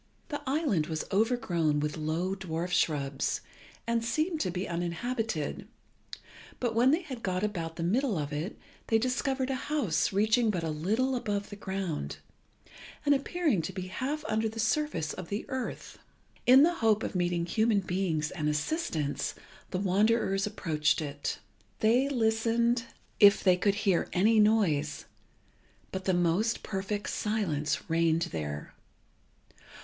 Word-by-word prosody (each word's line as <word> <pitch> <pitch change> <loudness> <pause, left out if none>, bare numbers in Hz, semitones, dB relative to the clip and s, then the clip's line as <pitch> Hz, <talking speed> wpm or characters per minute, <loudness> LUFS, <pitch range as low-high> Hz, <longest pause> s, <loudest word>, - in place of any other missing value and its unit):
The 290 -2 -3
island 265 - +1
was 160 -1 -3
overgrown 190 -8 +1
with 150 0 -2
low 160 +4 -1
dwarf 180 -2 -4
shrubs, 140 -5 0 0.4
and 230 0 0
seemed 310 +8 0
to 185 - 0
be 180 +2 -3
uninhabited; 175 - -2 0.9
but 240 -2 0
when 240 +3 +4
they 320 +6 +2
had 260 -7 -7
got 185 -1 -1
about 170 -6 -2
the 170 - -4
middle 220 +4 +1
of 150 0 -3
it, 155 +8 -4 0.3
they 225 - +4
discovered 260 +2 0
a 260 +1 -4
house 280 - +1
reaching 220 +4 +3
but 180 -5 -1
a 160 - -1
little 220 +13 0
above 205 -5 -2
the - - -6
ground, 190 - -4 0.9
and 290 - +5
appearing 285 - +1
to 175 - -4
be 185 -1 -6
half 275 +9 -3
under 220 +1 0
the 225 +1 -8
surface 230 - 0
of 180 - -8
the 205 +2 -3
earth. 260 -1 -5 0.5
In 260 +3 +9
the 345 +2 +4
hope 220 -1 +3
of - - -3
meeting 175 -2 0
human 215 +3 +2
beings 175 -4 -1
and 155 -4 -1
assistance, 150 - -1 0.3
the 185 - -2
wanderers 195 +1 +2
approached 155 -8 0
it. 145 -1 -4 0.4
They 245 +5 +3
listened 235 0 +1 0.3
if 205 -1 +7
they 185 -2 +5
could 195 +2 +1
hear 200 -4 +1
any 215 +5 +4
noise, 190 -9 +2 0.9
but 190 0 -5
the 190 - +2
most 175 +6 +1
perfect 200 0 -3
silence 155 -10 -1
reigned 165 0 +2
there. 75 -2 -5
200 Hz, 145 wpm, -29 LUFS, 165-230 Hz, 0.9 s, In